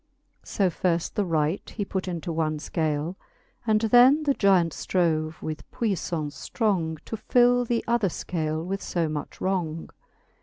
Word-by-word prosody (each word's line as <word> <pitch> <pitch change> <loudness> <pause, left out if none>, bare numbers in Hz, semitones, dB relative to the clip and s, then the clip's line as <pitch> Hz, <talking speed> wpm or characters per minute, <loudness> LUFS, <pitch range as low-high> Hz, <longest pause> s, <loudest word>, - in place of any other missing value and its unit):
So 190 -3 0
firft 170 0 0
the 210 - +1
right 160 +1 0
he 205 - -4
put 190 -1 -3
into 170 -1 -3
one 155 -1 0
fcale 155 +1 -2
j - - -29 0.5
And 215 -1 +3
then 245 +7 +6
the 285 -2 +2
Gyant 190 -7 +3
ftrove 160 -3 0
with 155 -1 -6
puifTance 170 -8 -3
ftrong 180 -9 0
To - - -4
fill 245 +1 +3
th'other 235 -3 +1
fcale 160 -2 -3
with 195 +2 -3
fb 165 -3 -1
much 150 -1 -6
wrong. 170 -4 -2
180 Hz, 150 wpm, -26 LUFS, 160-215 Hz, 0.5 s, then